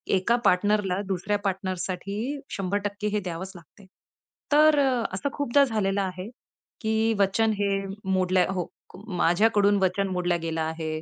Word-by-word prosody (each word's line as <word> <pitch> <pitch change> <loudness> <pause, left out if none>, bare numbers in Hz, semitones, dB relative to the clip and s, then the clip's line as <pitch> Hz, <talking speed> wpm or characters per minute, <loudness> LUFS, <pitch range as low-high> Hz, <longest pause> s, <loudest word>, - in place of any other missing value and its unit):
एका 190 +6 +2
पार्टनरला 195 0 +2
दुसऱ्या 195 +2 -1
पार्टनरसाठी 190 +1 -3 0.4
100% 205 +2 -2
हे - - +2
द्यावंच 185 +1 -5
लागतंय. 175 +4 -16 0.7
तर 305 0 +6
अ, 260 -4 +2
असं 285 - -2
खूपदा 285 0 +3
झालेलं 200 -4 0
आहे, 185 +1 -4 0.5
की 220 0 +1
वचन 205 +3 +2
हे 200 - +1 0.4
मोडलंय 185 -1 +2
हो. 180 -3 -2 0.5
माझ्याकडून 205 +3 +3
वचन 190 +2 +1
मोडलं 180 -1 0
गेलं 165 0 -2
आहे. 160 0 -3
195 Hz, 130 wpm, -26 LUFS, 180-210 Hz, 0.7 s, तर